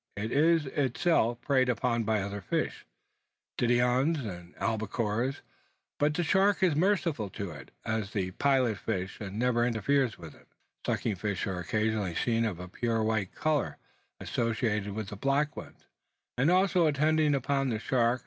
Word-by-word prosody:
It 110 +2 -3
is 160 +2 +3
itself 130 -2 +1
preyed 130 -3 +2
upon 120 -1 0
by 110 -2 +1
other 100 +1 -5
fish, 90 - -2 0.7
diodons 125 +6 +2
and 90 -3 -8
albacores; 115 +3 -1 0.6
but 150 +1 +2
the 175 - +1
shark 190 +3 +3
is 175 -5 +4
merciful 165 - +1
to 100 -1 -5
it, 70 -2 -11 0.2
as 110 -2 -1
to - - -17
the 95 -2 -1
pilot 130 -2 +2
fish, 95 -4 -3
and 100 0 -5
never 120 0 +2
interferes 120 +2 +1
with 80 -3 -10
it. - - -21 0.4
Sucking 105 -4 0
fish 100 -1 -2
are 95 -3 -3
occasionally 105 0 -1
seen 115 +3 +1
of 100 -6 -3
a 90 - -7
pure 115 +3 -1
white 110 -4 -1
colour 155 -3 0 0.4
associating 110 -3 -1
with 110 -3 -4
the - - -6
black 140 +5 +1
ones, - - -10 0.5
and 135 +6 +2
also 185 -2 +4
attending 150 0 +3
upon 135 0 0
the 115 - 0
shark. 120 +2 +1
120 Hz, 160 wpm, -29 LUFS, 105-140 Hz, 0.7 s, is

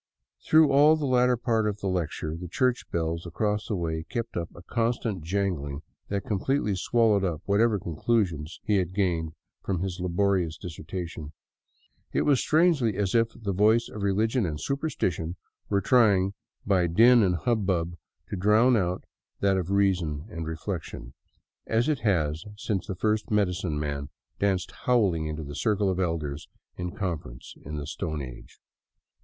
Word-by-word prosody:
Through 155 -1 +5
all 145 +3 +6
the 155 -2 -2
latter 125 -1 +3
part 115 -2 +1
of 105 -1 -2
the - - -6
lecture 80 -3 -2
the 90 +2 -7
church 125 +8 0
bells 85 0 -2
across 105 +5 -1
the 110 - -1
way 80 -3 -2
kept 115 -2 -4
up 85 -1 -2
a 90 - -12
constant 115 -3 -1
jangling 80 -5 -2 0.2
that 100 -1 -3
completely 105 +1 0
swallowed 105 +1 +2
up 85 -5 -2
whatever 105 +2 +3
conclusions 85 -2 -1
he 105 -2 +2
had 95 -1 -1
gained 85 -5 0 0.3
from 90 -3 -1
his 95 -1 -3
laborious 90 -2 +1
dissertation. 80 -2 -7 0.8
It - - +2
was 140 -4 +3
strangely 155 - +3
as 100 -2 0
if 115 -1 +4
the 100 -4 -3
voice 110 +4 +3
of 105 - -7
religion 110 +5 +1
and 75 -5 -2
superstition 90 - -2 0.3
were 100 -1 +2
trying 100 -6 +4 0.3
by 95 -3 +3
din 115 +8 +6
and 90 -3 +3
hubbub 90 -3 0 0.3
to - - -3
drown 105 +6 +4
out 90 -4 0 0.4
that 100 -1 +3
of 90 -2 -2
reason 90 -7 +1
and 80 -1 -5
reflection, 80 -6 -5 0.5
as 115 +1 +2
it 150 -4 +1
has 80 -8 0
since 100 -1 -2
the 95 - -3
first 105 +3 0
medicine 90 -6 0
man 70 -1 -3 0.3
danced 95 -2 0
howling 100 -11 +2
into 75 0 -4
the 70 0 -7
circle 100 +4 +1
of 95 - -2
elders 80 -5 -2 0.3
in 90 0 -4
conference 85 - -5
in 75 +2 -7
the 75 - -4
Stone 75 0 -4
Age. 60 -2 -11
95 Hz, 160 wpm, -27 LUFS, 85-110 Hz, 0.8 s, all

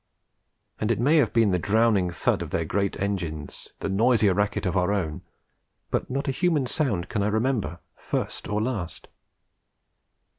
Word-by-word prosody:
And 105 - -1
it - - 0
may 145 +7 +4
have 135 -7 +3
been 115 -4 +3
the 90 - +1
drowning 105 -1 +3
thud 85 - 0
of - - -4
their 80 - -1
great 100 +4 -1
engines, 85 -7 -4
the - - -1
noisier 110 0 +3
racket 105 +1 0
of 90 - 0
our 90 +1 +2
own 85 -7 -2 0.7
but - - -1
not 135 +3 -2
a - - +2
human 160 -1 +1
sound 120 - -1
can 105 - -2
I 100 - +1
remember 110 - 0 0.2
first - - -3
or 105 +1 -1
last. 105 -9 -4
105 Hz, 170 wpm, -26 LUFS, 95-120 Hz, 0.7 s, may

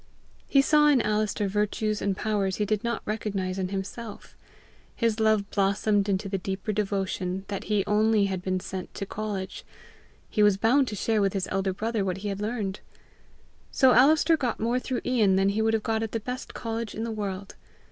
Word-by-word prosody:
He 275 -1 +4
saw 300 +1 +5
in 290 -3 +5
Alister 210 -1 0
virtues 210 +1 -1
and 195 -2 -1
powers 200 -3 0
he 210 - 0
did 210 +1 -1
not 235 -1 -2
recognize 195 -3 -2
in 185 - -1
himself. 200 +3 -6 0.6
His 230 -2 0
love 215 -2 +3
blossomed 200 +1 +1
into 195 +1 0
the 195 0 -2
deeper 195 +3 -3
devotion 195 -2 -2
that 200 -2 -4
he 210 -2 +1
only 210 0 +3
had 190 -2 -2
been 185 0 -1
sent 185 0 -6
to 200 - -4
college: 205 -2 -5 0.6
he 210 - 0
was 205 -2 +5
bound 250 +6 +3
to 210 - -4
share 215 +1 +1
with 195 -1 +1
his 195 -2 -1
elder 195 0 0
brother 215 +2 -2
what 185 -1 -2
he 205 +2 -4
had 200 0 -4
learned. 210 -3 -2 0.9
So 260 -1 +4
Alister 305 +6 +5
got 250 -7 -2
more 235 +3 +1
through 255 -1 -3
Ian 220 -7 +3
than 195 +1 +3
he 205 +2 0
would 225 0 +2
have 220 - -2
got 220 0 0
at 225 -1 -4
the 225 - 0
best 250 +4 -6
college 230 -1 -4
in 220 - -3
the 230 - -3
world. 200 -2 -4
210 Hz, 200 wpm, -27 LUFS, 195-225 Hz, 0.9 s, saw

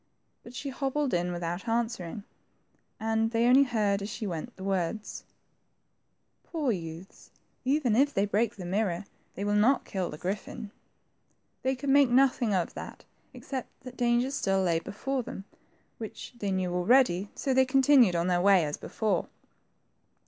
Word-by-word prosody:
But 235 - -13
she 280 - -4
hobbled 275 +1 -1
in 175 0 0
without 175 +4 -4
answering, 225 -5 -2 0.8
and 225 0 +1
they 230 0 +1
only 255 +3 +7
heard, 215 -6 +1
as 200 - -4
she 215 - -5
went, 185 +6 -5
the 190 - -9
y^ords, 195 +2 -2 0.6
— - - -48
Poor 305 -7 0
youths, 170 0 -7 0.3
even 260 -4 +2
if 280 +4 +4
they 200 -6 +1
break 215 +3 0
the 185 - -8
mirror, 190 -1 -1 0.3
they 200 - -4
will 205 - +1
not 225 +6 +3
kill 185 -3 -3
the 150 - -7
griffin." 200 +4 -5 0.9
They 265 +1 0
could 270 +2 -4
make 280 -2 +6
nothing 250 -3 +3
of 185 -3 0
that - - -9 0.3
except 265 -3 -6
that 255 0 -10
dangers 245 +2 +1
still 195 -6 +1
lay 170 -2 +2
before 260 +9 -3
them, 195 -4 -8 0.5
which 220 +2 -8
they 205 -4 -3
knew 185 -2 -1
already, 195 0 +3
so 270 - -1
they 260 0 +5
continued 260 -6 +5
on 170 0 +1
their 180 -1 +2
way 190 -3 +5
as 150 - -3
before. 210 -6 -1
215 Hz, 165 wpm, -29 LUFS, 185-255 Hz, 0.9 s, only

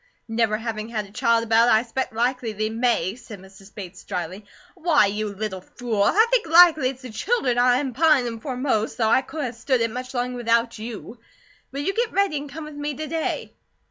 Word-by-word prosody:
"Never 225 -2 +1
having 220 -1 -5
had 215 -3 -3
a 200 - -16
child 230 +2 +2
about, 230 +1 +4
I 220 0 +4
s'pect 255 +2 -3
likely 240 0 -1
they 215 +1 -2
may," 225 -6 +1
said 230 -3 -11
Mrs. 190 +1 -16
Bates, 190 -3 -9
dryly. 185 +1 -5 0.3
"Why, 335 - +3
you 210 +2 -2
little 200 -2 -5
fool! 225 +1 -3
I 420 - +5
think - - +2
likely 325 -5 +6
it's 260 0 -9
the 250 - -8
children 250 - 0
I 245 0 +4
am 265 -1 -2
pinin' 260 -5 +2
for 255 +2 -5
most, 250 -5 -1
though 225 -3 +2
I 260 - +4
couldn't 285 -1 -4
a - - -10
stood 245 +2 0
it 230 -1 0
much 255 +2 -6
longer 250 0 -2
without 230 -1 +1
YOU. 230 +1 -8 0.5
Will 275 +1 -4
you 390 - -1
get 465 +1 -1
ready 395 -5 +1
and 285 0 -6
come 310 +3 -7
with 305 0 -9
me 290 0 -4
to 310 - -5
day?" 320 +1 -3
240 Hz, 215 wpm, -23 LUFS, 220-280 Hz, 0.5 s, likely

